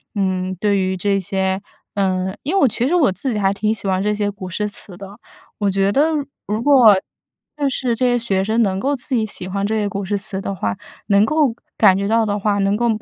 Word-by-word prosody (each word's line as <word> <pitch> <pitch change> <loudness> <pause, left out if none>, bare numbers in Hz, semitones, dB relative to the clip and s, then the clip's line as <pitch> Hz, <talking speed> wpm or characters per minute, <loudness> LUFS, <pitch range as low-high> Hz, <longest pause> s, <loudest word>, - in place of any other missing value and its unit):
嗯， 185 -2 -1
对 205 -2 +2
于 185 0 0
这 200 +1 +1
些 190 0 -1 0.3
呃， 190 -1 0
因 320 +8 -1
为 - - +4
我 - - +6
其 240 +2 -1
实 350 - +1
我 280 - +4
自 250 +6 -3
己 - - -2
还 195 -1 +2
挺 210 +2 0
喜 205 - -6
欢 185 0 +1
这 210 +1 0
些 205 -1 -1
古 190 -2 -8
诗 210 +4 -2
词 185 -3 -8
的， 200 +3 -11 0.4
我 200 -1 +1
觉 195 +1 +1
得 290 +8 +3 0.4
如 215 +3 -2
果 250 -8 +7 0.6
就 285 - +1
是 250 -2 -1
这 255 - 0
些 245 -1 +2
学 195 -5 0
生 220 +3 +1
能 190 -3 +1
够 280 +6 0
自 260 +1 -2
己 225 -2 +1
喜 185 -3 -4
欢 200 +1 -2
这 220 +2 -1
些 210 -2 0
古 200 -1 -4
诗 205 - -1
词 200 -1 -4
的 195 - -4
话， 100 - -3 0.3
能 200 0 +4
够 295 -4 +1 0.2
感 195 -3 +5
觉 200 0 -1
到 225 +1 +3
的 205 -1 -1
话， 205 0 0
能 195 +1 +1
够 240 +1 +1
205 Hz, 265 characters per minute, -19 LUFS, 195-230 Hz, 0.6 s, 果